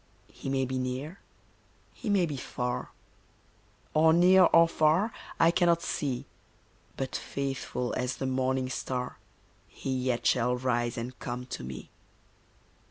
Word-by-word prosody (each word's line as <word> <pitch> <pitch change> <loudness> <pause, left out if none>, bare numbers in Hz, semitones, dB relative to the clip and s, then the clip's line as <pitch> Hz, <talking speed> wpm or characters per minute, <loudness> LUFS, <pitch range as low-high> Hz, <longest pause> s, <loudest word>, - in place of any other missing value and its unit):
He - - -6
may 135 -1 +1
be 130 0 -2
near, 130 +8 -4 0.7
he 230 - -6
may 195 -3 +4
be 150 -3 -4
far, 125 -1 -3 1.0
Or 160 +1 +5
near 180 +2 +7
or 165 0 +6
far 165 +7 +2 0.3
I 165 - +6
cannot 170 -1 +3
see, 135 -4 -2 0.7
But 135 -1 -3
faithful 135 -2 -3
as 125 0 -2
the 135 - -3
morning 130 0 0
star 125 0 -3 0.5
He 135 - -5
yet 125 -2 -1
shall 125 0 +3
rise 120 -2 0
and 125 +2 -5
come 125 +1 -5
to - - -5
me. 65 0 -8
130 Hz, 135 wpm, -29 LUFS, 125-165 Hz, 1.0 s, near